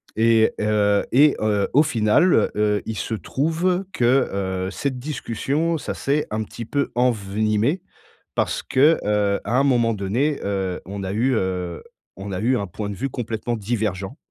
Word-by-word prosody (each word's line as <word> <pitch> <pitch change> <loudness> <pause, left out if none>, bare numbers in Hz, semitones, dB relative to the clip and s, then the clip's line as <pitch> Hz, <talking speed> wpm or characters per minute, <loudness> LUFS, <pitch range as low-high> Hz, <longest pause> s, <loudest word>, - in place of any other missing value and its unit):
et 115 0 +4
heu 105 -1 +2
et 145 +3 +5
heu, 105 -2 +1
au 150 +3 +6
final, 120 +6 +3
heu, 105 -1 +1
il 110 -2 -4
se 115 - -3
trouve 165 - -1
que, 125 0 +3 0.4
heu, - - -5
cette 135 +1 -3
discussion 150 +4 -2
ça 135 - -4
s'est 145 +2 0
un 110 0 -1
petit 115 +2 -8
peu 140 +4 -1
envenimé 110 - +1 0.5
parce - - -1
que, 150 +5 +4
heu, 105 -1 +1
à 120 +5 0
un - - +3
moment 120 -4 +3
donné, 120 +10 -1
heu, 95 -2 -2
on 100 +1 -6
a 95 - -3
eu, 125 +3 +1
heu, 90 -3 -2 0.3
on 100 +1 -6
a 90 - -3
eu 125 +3 +2
un 100 - -2
point 100 +3 -5
de 100 - -5
vue 135 +5 -3
complètement 115 0 -3
divergent. 105 +1 -3
110 Hz, 170 wpm, -22 LUFS, 100-135 Hz, 0.5 s, au